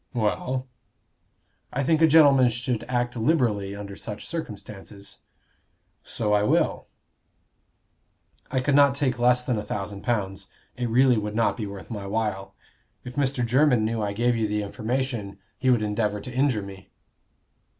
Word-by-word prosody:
"Well?" 125 +3 -1 1.1
"I 140 - -1
think 160 +3 +2
a 160 - +7
gentleman 140 -5 +6
should 120 0 -2
act 120 0 -1
liberally 110 -7 +1
under 100 -1 -7
such 105 0 -7
circumstances." 105 -9 -8 0.8
"So 105 -2 -1
I 105 - +4
will." 105 - +1 1.6
"I 130 - 0
could 145 +2 0
not 140 -1 +5
take 130 -4 0
less 125 +1 +3
than 125 -4 -1
a - - -4
thousand 100 -1 -5
pounds. 100 -4 -2 0.3
It 125 -1 -2
really 125 0 +4
would 105 0 -4
not 115 0 +2
be 110 -3 -4
worth 100 +1 -9
my 100 -3 -5
while. 105 -2 -2 0.5
If 125 - -8
Mr. 135 -3 0
Jermyn 125 -2 +3
knew 115 0 -1
I 105 -1 -1
gave 120 +3 +1
you 110 -1 0
the 105 0 -1
information, 115 -1 -3 0.2
he 130 - +1
would 120 -4 +3
endeavor 105 0 -1
to 125 +4 -8
injure 130 -5 +1
me." 95 -1 -11
115 Hz, 155 wpm, -25 LUFS, 105-130 Hz, 1.6 s, a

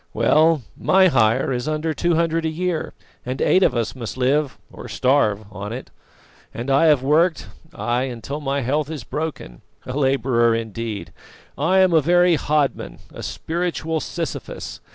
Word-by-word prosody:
Well, 155 -2 +3
my 190 -1 +4
hire 120 -2 +2
is 125 +3 -3
under 155 +1 -1
two 170 +1 +1
hundred 165 0 +1
a 160 - 0
year, 170 +1 -2 0.3
and 130 +2 -4
eight 185 - +3
of - - +3
us 115 -2 -1
must 120 -1 -7
live 135 0 +1 0.2
or - - -9
starve 110 -6 +1
on 105 +1 -6
it. 125 +3 -7 0.6
And 120 +4 -3
I 140 +4 +4
have 145 -4 +4
worked, 160 +5 +2 0.3
ay, 120 +1 -1
until 135 +4 -6
my 140 0 -1
health 145 +4 -1
is 155 -4 -6
broken. 150 - -5 0.2
A 125 - -5
labourer 130 -4 +2
indeed! 115 -1 -5 0.4
I 185 +6 +3
am 185 -2 +4
a 160 - +5
very 175 +3 +4
hodman, 150 -2 -1 0.2
a - - -8
spiritual 165 -1 -3
Sisyphus. 165 0 -6
145 Hz, 160 wpm, -21 LUFS, 125-160 Hz, 0.6 s, a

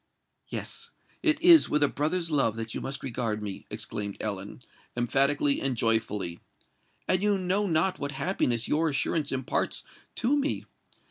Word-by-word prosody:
"Yes—it 315 -2 -4
is 345 -2 +8
with 150 0 +2
a - - +5
brother's 165 +4 -1
love 135 -7 +2
that 115 0 -5
you - - -4
must 135 0 -4
regard 115 -4 -2
me," 100 -2 -6
exclaimed 100 -1 -4
Ellen, 100 +2 -5 0.4
emphatically 140 +4 +2
and 135 -3 +1
joyfully; 105 -6 +1 0.7
"and 185 0 +2
you 205 -1 +2
know 190 +2 0
not 175 +3 +1
what 140 +1 -3
happiness 135 -6 0
your 160 +2 +2
assurance 145 +1 0
imparts 130 -1 -1 0.3
to 245 +5 +2
me! 290 0 -1
140 Hz, 145 wpm, -28 LUFS, 115-180 Hz, 0.7 s, is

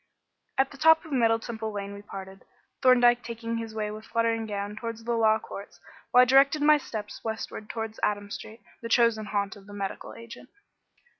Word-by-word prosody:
At 270 0 +2
the 275 - -13
top 320 +1 +6
of 315 - -11
Middle 230 -4 +3
Temple 220 -1 -5
Lane 200 -1 -5
we 200 - -9
parted, 195 -1 -9 0.4
Thorndyke 245 -1 +5
taking 230 0 -4
his 225 -1 -6
way 210 -1 -2
with 215 +1 -8
fluttering 230 -1 0
gown 205 0 -4
towards 230 0 -6
the 235 - -3
Law 220 -1 +4
Courts, 200 -4 -10 0.3
while 250 - +7
I - - +4
directed 275 +3 +4
my 300 0 +6
steps 215 -6 -7
westward 220 -1 -5
towards 225 -1 -5
Adam 205 -1 -1
Street, 220 +3 -8 0.2
the 230 - -6
chosen 230 -3 +3
haunt 200 0 -1
of 200 -1 -16
the 205 - -11
medical 200 -1 -5
agent. 230 +2 -11
225 Hz, 195 wpm, -27 LUFS, 210-240 Hz, 0.4 s, while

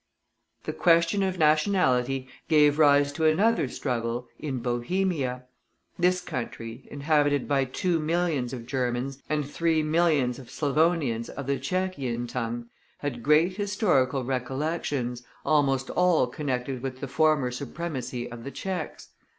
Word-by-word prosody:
The - - -4
question 170 +3 +3
of 190 -1 0
nationality 150 -6 +2 0.2
gave 150 -1 +4
rise 145 -1 +5
to 160 +2 -1
another 195 +3 +3
struggle 120 -2 -3
in 140 -4 -3
Bohemia. 125 +2 -1 0.6
This 180 +1 +3
country, 115 -5 -6
inhabited 145 -1 +1
by 140 -2 +2
two 170 +6 0
millions 155 -5 0
of 120 -3 -6
Germans, 130 +1 -2
and 150 -2 0
three 160 +1 +1
millions 155 -6 +2
of 125 - -12
Slavonians 145 -6 +1
of 140 - -6
the 140 0 -1
Tschechian 135 -7 -2
tongue, 120 -1 -3 0.3
had 135 -5 -4
great 155 - +3
historical 160 - +1
recollections, 130 -1 -2 0.2
almost 140 -3 +2
all 180 -6 +3
connected 130 -1 -3
with 130 -1 -5
the 140 - -4
former 150 -2 +2
supremacy 130 -2 -4
of 115 -1 -8
the 140 - -5
Tschechs. 185 -1 -5
140 Hz, 130 wpm, -27 LUFS, 125-160 Hz, 0.6 s, rise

